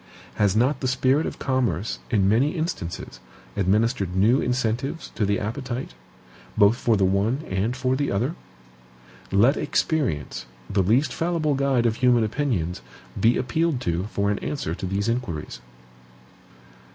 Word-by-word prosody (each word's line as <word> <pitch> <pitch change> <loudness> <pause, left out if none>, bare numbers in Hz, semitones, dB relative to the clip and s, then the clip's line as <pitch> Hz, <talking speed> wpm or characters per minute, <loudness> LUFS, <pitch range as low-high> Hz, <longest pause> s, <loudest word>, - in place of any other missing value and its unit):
Has 100 -2 +2
not 130 +5 +2
the 130 - -1
spirit 130 +4 +2
of - - -6
commerce, 115 - -1
in 100 -5 +2
many 125 - +2
instances, 90 - -4 0.4
administered 100 -1 +1
new 110 +8 +4
incentives 125 +5 -2
to 105 - 0
the 100 -1 +1
appetite, 120 - -4 0.6
both 105 +2 +6
for 115 -3 +1
the 95 - +3
one 105 +9 +1
and 100 +6 -1
for 130 0 +1
the 140 +1 -1
other? 120 +10 0 1.0
Let 115 +9 +4
experience, 105 - -1 0.2
the 100 - +1
least 115 +11 +2
fallible 165 -3 0
guide 135 -3 +1
of 115 -1 +1
human 125 -2 +4
opinions, 105 - -1 0.4
be 115 +2 +4
appealed 160 +2 0
to 85 -3 -1
for 100 -1 -1
an 105 - -1
answer 140 - -3
to 95 - -4
these 100 +3 -1
inquiries. 100 - -3
115 Hz, 145 wpm, -24 LUFS, 100-135 Hz, 1.0 s, both